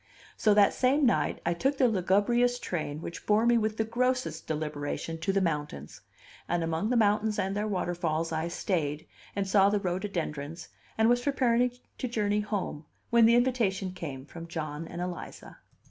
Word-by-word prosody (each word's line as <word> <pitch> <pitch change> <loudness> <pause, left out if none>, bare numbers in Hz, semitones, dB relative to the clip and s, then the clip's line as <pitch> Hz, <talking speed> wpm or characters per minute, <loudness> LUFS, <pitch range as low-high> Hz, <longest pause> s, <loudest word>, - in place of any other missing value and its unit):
So 210 -2 +3
that 205 -1 +5
same 270 +3 +3
night 240 - +1
I 170 - +2
took 270 +10 0
the 260 - +4
lugubrious 225 +5 +2
train 155 -8 -4
which 170 - -7
bore 215 +2 +4
me 240 0 +5
with 215 0 -1
the 220 - +2
grossest 250 +3 -1
deliberation 155 +1 -3
to 195 - 0
the 195 0 +1
mountains; 150 - -3 0.5
and 175 -1 +1
among 165 +6 -1
the 250 - +2
mountains 215 0 +2
and 195 +1 -1
their 210 +1 -1
waterfalls 170 -4 -1
I 160 +1 -1
stayed 160 -4 -2 0.3
and 200 -1 -1
saw 195 0 +5
the 205 0 +1
rhododendrons, 175 -5 -4 0.3
and 220 0 +4
was 245 +1 +3
preparing 250 -3 +2 0.3
to 255 - -1
journey 210 -3 0
home 205 -7 -3 0.3
when 235 -1 +6
the 235 - +5
invitation 230 -7 +1
came 140 -7 -6
from 165 +2 -9
John 155 -1 -5
and 175 - -6
Eliza. 180 -1 -7
195 Hz, 175 wpm, -29 LUFS, 165-230 Hz, 0.5 s, when